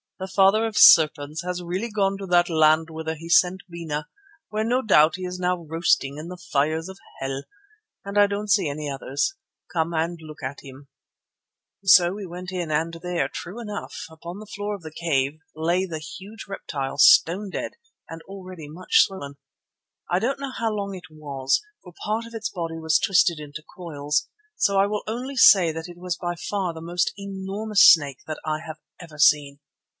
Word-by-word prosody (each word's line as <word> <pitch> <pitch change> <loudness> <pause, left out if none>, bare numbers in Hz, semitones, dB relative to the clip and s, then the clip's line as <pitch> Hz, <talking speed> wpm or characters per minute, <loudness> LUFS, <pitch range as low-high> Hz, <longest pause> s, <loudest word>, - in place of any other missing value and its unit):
"The 190 - -5
Father 195 +3 +4
of 220 - -5
Serpents 155 0 +6
has 180 0 -4
really 185 +7 -3
gone 195 -2 0
to 195 - -6
that 175 -1 +4
land 155 0 +3
whither 160 0 -4
he 165 +2 -10
sent 180 +2 +4
Bena, 160 -3 -5 0.4
where 215 +1 -1
no 250 +3 +1
doubt 160 -6 +5
he 185 - -7
is 180 0 -5
now 180 -1 -1
roasting 155 -3 0
in 155 +2 -7
the 180 +1 -8
fires 155 +4 0
of 190 +1 -11 0.2
hell, 135 +1 -4 0.6
and 200 +1 -4
I 205 - +6
don't 205 +1 -4
see 200 -5 +3
any 145 +1 -4
others. 140 - -2 0.4
Come 165 0 0
and 165 +2 -1
look 155 -2 -11
at 130 +2 -5
him." 135 0 -13 0.9
So 185 -2 +7
in 185 - -5
we 205 -1 -6
went 180 +1 -7
and 165 -2 -1
there, 175 -5 -1
true 195 +7 -7
enough, 210 -3 -6 0.2
upon 170 +4 -9
the 215 - -9
floor 205 0 -4
of 190 - -12
the 160 - -8
cave 150 -3 -1 0.2
lay 170 +4 +1
the 165 -4 -5
huge 195 +8 -10
reptile 140 -8 -5
stone 195 +3 +5
dead - - -4 0.3
and 165 0 -9
already 185 -5 -10
much 170 +5 +3
swollen. 140 -8 -8 0.7
I 180 - +3
don't 265 +6 -1
know 275 -1 -4
how 230 -3 -2
long 200 -2 -4
it 175 -4 -12
was, 140 -3 -1 0.2
for 180 - -13
part 220 +2 -1
of 230 0 -11
its 225 0 -3
body 165 -4 -5
was 160 0 +2
twisted 170 -4 +3
into 150 0 -9
coils, 150 -3 -2 0.3
so 200 -1 +2
I 195 - +5
will 210 0 -3
only 250 +5 -4
say 185 -9 +7
that 160 +1 -6
it 175 -1 -12
was 180 0 -3
by 175 0 -4
far 185 0 -3
the 160 - -9
most 175 +2 0
enormous 200 +2 -1
snake 145 -5 +5
that 155 - -5
I 155 0 -1
have 155 -1 -7 0.2
ever 165 -4 -12
seen. 145 -2 +3
175 Hz, 190 wpm, -24 LUFS, 155-195 Hz, 0.9 s, So